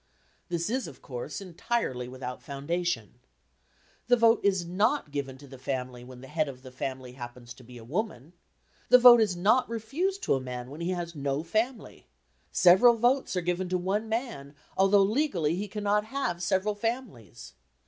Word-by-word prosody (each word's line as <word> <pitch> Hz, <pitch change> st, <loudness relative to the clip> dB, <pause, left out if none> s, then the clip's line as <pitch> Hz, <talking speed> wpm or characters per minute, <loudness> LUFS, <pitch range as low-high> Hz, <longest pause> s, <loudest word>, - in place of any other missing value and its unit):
This 170 Hz, -1 st, -1 dB
is, 260 Hz, -3 st, -1 dB
of 140 Hz, -, -13 dB
course, 130 Hz, +8 st, -6 dB
entirely 175 Hz, -, -2 dB
without 125 Hz, 0 st, -7 dB
foundation. 140 Hz, -, -3 dB, 0.9 s
The 245 Hz, 0 st, +5 dB
vote 230 Hz, 0 st, +5 dB
is 190 Hz, -3 st, +2 dB
not 205 Hz, -, 0 dB
given 135 Hz, -2 st, -4 dB
to 140 Hz, -, -14 dB
the 135 Hz, -1 st, -12 dB
family 125 Hz, -2 st, -4 dB
when 125 Hz, 0 st, -12 dB
the 130 Hz, -, -11 dB
head 155 Hz, 0 st, -1 dB
of 130 Hz, -1 st, -11 dB
the 130 Hz, -, -10 dB
family 130 Hz, 0 st, -5 dB
happens 120 Hz, -1 st, -9 dB
to 130 Hz, -, -16 dB
be 125 Hz, +1 st, -12 dB
a 115 Hz, -, -11 dB
woman; 165 Hz, -, -4 dB, 0.6 s
the 250 Hz, -, +9 dB
vote 245 Hz, -1 st, +9 dB
is 205 Hz, -5 st, +1 dB
not 215 Hz, +9 st, +3 dB
refused 290 Hz, -, -2 dB
to -, -, +2 dB
a 135 Hz, -, 0 dB
man 125 Hz, 0 st, -6 dB
when 150 Hz, +4 st, -8 dB
he 170 Hz, -, -2 dB
has 175 Hz, -2 st, -3 dB
no 140 Hz, 0 st, -2 dB
family; 220 Hz, +7 st, -3 dB, 0.4 s
several 190 Hz, +7 st, +6 dB
votes 245 Hz, 0 st, +1 dB
are 180 Hz, -, +1 dB
given 180 Hz, +1 st, -2 dB
to 185 Hz, -, +1 dB
one 200 Hz, +5 st, -1 dB
man, 220 Hz, -, -4 dB, 0.2 s
although 195 Hz, +1 st, +5 dB
legally 195 Hz, -, +1 dB
he 200 Hz, +3 st, -3 dB
cannot 210 Hz, 0 st, 0 dB
have 220 Hz, -8 st, -3 dB
several 190 Hz, +4 st, +1 dB
families. 205 Hz, -, -5 dB
175 Hz, 180 wpm, -28 LUFS, 130-220 Hz, 0.9 s, the